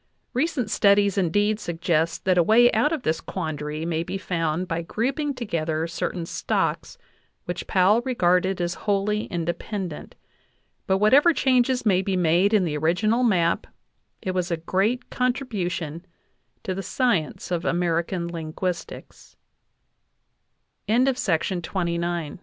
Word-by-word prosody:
Recent 255 Hz, -5 st, -1 dB
studies 200 Hz, -1 st, +4 dB
indeed 205 Hz, +3 st, +1 dB
suggest 165 Hz, -3 st, -1 dB
that 185 Hz, -1 st, +3 dB
a -, -, +7 dB
way 235 Hz, +7 st, +5 dB
out 230 Hz, +7 st, +2 dB
of 315 Hz, -6 st, -2 dB
this 160 Hz, +1 st, 0 dB
quandary 155 Hz, -3 st, -4 dB
may 165 Hz, -1 st, -1 dB
be 170 Hz, -, -4 dB
found 170 Hz, -2 st, -2 dB
by 165 Hz, 0 st, -2 dB
grouping 270 Hz, -, -2 dB
together 165 Hz, -9 st, -2 dB
cer 165 Hz, 0 st, -2 dB
tain 175 Hz, -2 st, -5 dB
stocks -, -, -2 dB, 0.5 s
which 175 Hz, 0 st, -5 dB
Powell 195 Hz, +5 st, +4 dB
regarded 185 Hz, -6 st, +1 dB
as 175 Hz, 0 st, -1 dB, 0.2 s
wholly 205 Hz, +2 st, +1 dB
independent; 175 Hz, 0 st, -4 dB, 0.7 s
but 190 Hz, -, +3 dB
'whatever 270 Hz, -, +5 dB
changes 255 Hz, -1 st, +2 dB
may 190 Hz, -3 st, +3 dB
be 190 Hz, -1 st, -1 dB
made 175 Hz, +3 st, +3 dB
in 210 Hz, -4 st, +4 dB
the 150 Hz, -3 st, -2 dB
original 180 Hz, +10 st, +1 dB
map, 180 Hz, -8 st, +2 dB, 0.6 s
it 185 Hz, -, -1 dB
was 185 Hz, 0 st, -1 dB
a 170 Hz, -, -1 dB
great 195 Hz, +9 st, -1 dB
contribution 185 Hz, -, -2 dB, 0.6 s
to 190 Hz, -, -2 dB
the 195 Hz, -, -4 dB
science 215 Hz, -, 0 dB
of 175 Hz, -1 st, -1 dB
American 170 Hz, 0 st, 0 dB
ling 165 Hz, -2 st, -6 dB
185 Hz, 125 wpm, -24 LUFS, 170-215 Hz, 0.7 s, a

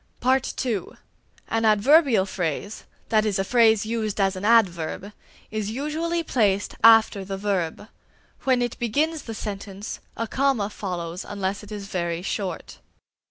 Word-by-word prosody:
(2) 220 Hz, -9 st, -3 dB, 0.5 s
An 225 Hz, 0 st, 0 dB
adverbial 225 Hz, -, +5 dB
phrase, 190 Hz, +2 st, -4 dB, 0.2 s
that 215 Hz, -1 st, +3 dB
is 210 Hz, -3 st, 0 dB
a 195 Hz, -, +1 dB
phrase 220 Hz, -1 st, +4 dB
used 220 Hz, -2 st, -2 dB
as 195 Hz, -1 st, +2 dB
an 185 Hz, -, -6 dB
adverb, 200 Hz, -3 st, +2 dB, 0.4 s
is 215 Hz, -1 st, -2 dB
usually 315 Hz, +7 st, -2 dB
placed 205 Hz, -9 st, +1 dB
after 225 Hz, -3 st, +6 dB
the 195 Hz, 0 st, -5 dB
verb; 195 Hz, -1 st, -2 dB, 0.6 s
when 255 Hz, -2 st, +2 dB
it 240 Hz, -, -4 dB
begins 300 Hz, +7 st, 0 dB
the 225 Hz, -, -7 dB
sentence, 200 Hz, -1 st, -6 dB, 0.2 s
a 230 Hz, -, -1 dB
comma 255 Hz, -5 st, 0 dB
follows 180 Hz, -3 st, -5 dB
it -, -, -14 dB
unless 200 Hz, -1 st, -3 dB
it 210 Hz, 0 st, -13 dB
is 205 Hz, -1 st, -6 dB
very 170 Hz, -3 st, -3 dB
short. 190 Hz, -3 st, -4 dB
210 Hz, 145 wpm, -24 LUFS, 195-230 Hz, 0.6 s, after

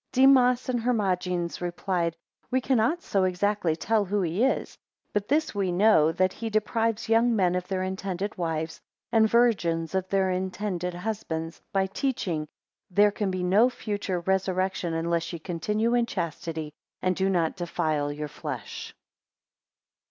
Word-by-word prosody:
16 260 Hz, -, +5 dB
Demas 250 Hz, -1 st, +3 dB
and 250 Hz, -2 st, 0 dB
Hermogenes 180 Hz, -8 st, 0 dB
replied, 175 Hz, -1 st, -1 dB, 0.3 s
We 260 Hz, -, +2 dB
cannot 260 Hz, +6 st, +1 dB
so 195 Hz, -2 st, +1 dB
exactly 185 Hz, -2 st, +1 dB
tell 220 Hz, +4 st, +1 dB
who 200 Hz, +1 st, 0 dB
he 175 Hz, +7 st, 0 dB
is; 265 Hz, -, 0 dB, 0.4 s
but 205 Hz, -1 st, 0 dB
this 305 Hz, +4 st, +1 dB
we 195 Hz, -3 st, 0 dB
know, 175 Hz, -4 st, +5 dB
that 185 Hz, +2 st, +1 dB
he 225 Hz, 0 st, -4 dB
deprives 220 Hz, +1 st, 0 dB
young 230 Hz, +1 st, +4 dB
men 185 Hz, -4 st, +2 dB
of 180 Hz, 0 st, -2 dB
their 185 Hz, -1 st, -1 dB
(intended) 190 Hz, +1 st, -3 dB
wives, 165 Hz, -3 st, -3 dB, 0.3 s
and 220 Hz, -1 st, +4 dB
virgins 180 Hz, -9 st, +2 dB
of 190 Hz, -1 st, -1 dB
their 190 Hz, -1 st, +2 dB
(intended) 185 Hz, -1 st, -2 dB
husbands, 175 Hz, -5 st, -4 dB
by 195 Hz, -1 st, +2 dB
teaching, 190 Hz, -, -2 dB, 0.4 s
There 205 Hz, +3 st, +4 dB
can 205 Hz, -1 st, -2 dB
be 185 Hz, -1 st, -2 dB
no 205 Hz, +7 st, +5 dB
future 205 Hz, -7 st, -3 dB
resurrection, 185 Hz, -2 st, 0 dB
unless 165 Hz, 0 st, -1 dB
ye -, -, -3 dB
continue 210 Hz, +8 st, -1 dB
in 240 Hz, -1 st, +2 dB
chastity, 160 Hz, -4 st, -4 dB, 0.3 s
and 185 Hz, 0 st, +2 dB
do 190 Hz, +1 st, +1 dB
not 170 Hz, -4 st, +1 dB
defile 155 Hz, -5 st, -1 dB
your 150 Hz, +1 st, -4 dB
flesh. -, -, -7 dB
190 Hz, 150 wpm, -27 LUFS, 175-215 Hz, 0.4 s, 16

